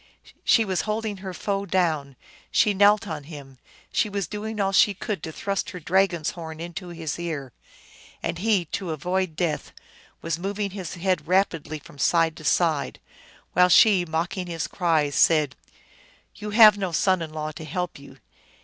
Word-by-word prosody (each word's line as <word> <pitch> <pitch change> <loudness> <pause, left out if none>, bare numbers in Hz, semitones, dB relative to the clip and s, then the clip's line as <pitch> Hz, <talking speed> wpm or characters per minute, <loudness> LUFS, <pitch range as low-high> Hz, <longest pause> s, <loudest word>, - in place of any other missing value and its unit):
She 225 - +4
was 190 -3 0
holding 215 -1 -2
her 190 0 -6
foe 200 +2 -3
down, 155 -8 0 0.3
she 210 - +3
knelt 205 +2 +4
on 150 -4 -5
him, 140 -4 -11 0.3
she 215 - +1
was 200 -2 -2
doing 215 +2 -5
all 195 -1 +1
she 200 +1 +4
could 200 -2 -4
to 160 - -6
thrust 200 +4 -3
her 180 - -7
dragon 180 +1 +1
s 155 - -1
horn 160 -2 -8
into 175 +2 -6
his 165 -2 -5
ear. 150 -8 -5 0.7
And 170 0 -2
he, 200 -3 +2
to 180 +3 -4
avoid 180 +2 -2
death, 160 -3 -2 0.5
was 165 0 -2
mov 195 +3 -4
ing 205 -2 -2
his 185 -4 -6
head 185 +1 -1
rapidly 170 -4 +1
from 145 -1 -15
side 165 +1 +2
to 155 - -11
side, 155 -1 +1 0.5
while 180 0 +5
she, 190 +1 +6
mocking 175 +3 -3
his 165 -2 -3
cries, 160 -6 0
said, 155 -4 +3 0.4
" - - -30
You 210 - -6
have 210 -1 +7
no 190 -3 -2
son 185 +2 +2
in 160 -2 -5
law 155 0 -4
to 155 - -9
help 175 +1 -4
you." 140 -1 -14
175 Hz, 180 wpm, -25 LUFS, 160-195 Hz, 0.7 s, have